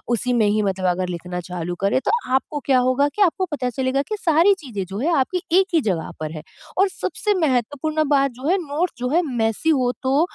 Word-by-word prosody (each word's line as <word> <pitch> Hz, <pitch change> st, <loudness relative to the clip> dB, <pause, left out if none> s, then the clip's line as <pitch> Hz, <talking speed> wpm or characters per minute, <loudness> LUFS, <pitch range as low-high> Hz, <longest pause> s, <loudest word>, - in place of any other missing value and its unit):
उसी 250 Hz, +3 st, -1 dB
में 225 Hz, -3 st, +3 dB
ही 210 Hz, +1 st, +2 dB
मतलब 190 Hz, -2 st, -1 dB
अगर 180 Hz, +1 st, -1 dB
लिखना 180 Hz, +1 st, -5 dB
चालू 175 Hz, 0 st, -4 dB
करें 200 Hz, +6 st, +2 dB
तो -, -, +2 dB, 0.2 s
आपको 295 Hz, +2 st, -1 dB
क्या 260 Hz, -2 st, +4 dB
होगा 280 Hz, +3 st, +3 dB
कि 420 Hz, -, -2 dB
आपको 375 Hz, +1 st, +1 dB
पता 255 Hz, -4 st, -1 dB
चलेगा 265 Hz, +1 st, +1 dB
कि 430 Hz, -, -2 dB
सारी 335 Hz, +5 st, +4 dB
चीज़ें 205 Hz, -7 st, -4 dB
जो 195 Hz, +3 st, -6 dB
है 330 Hz, +6 st, +1 dB
आपकी 355 Hz, +7 st, 0 dB, 0.2 s
एक 385 Hz, -, +2 dB
ही 320 Hz, -, +4 dB
जगह 180 Hz, -8 st, -2 dB
पर 155 Hz, 0 st, -3 dB
है। 155 Hz, -1 st, -7 dB, 0.4 s
और 390 Hz, -, +4 dB
सबसे 420 Hz, -1 st, 0 dB
महत्वपूर्ण 290 Hz, +5 st, 0 dB
बात 275 Hz, -2 st, +3 dB
जो 285 Hz, -, -3 dB
है 380 Hz, -, +4 dB
नोट्स 320 Hz, +6 st, -1 dB
जो 250 Hz, 0 st, -1 dB
है 350 Hz, -, +5 dB
मेस्सी 235 Hz, +4 st, 0 dB
हो 245 Hz, 0 st, +2 dB
तो 270 Hz, +4 st, +2 dB
260 Hz, 225 wpm, -22 LUFS, 200-310 Hz, 0.4 s, है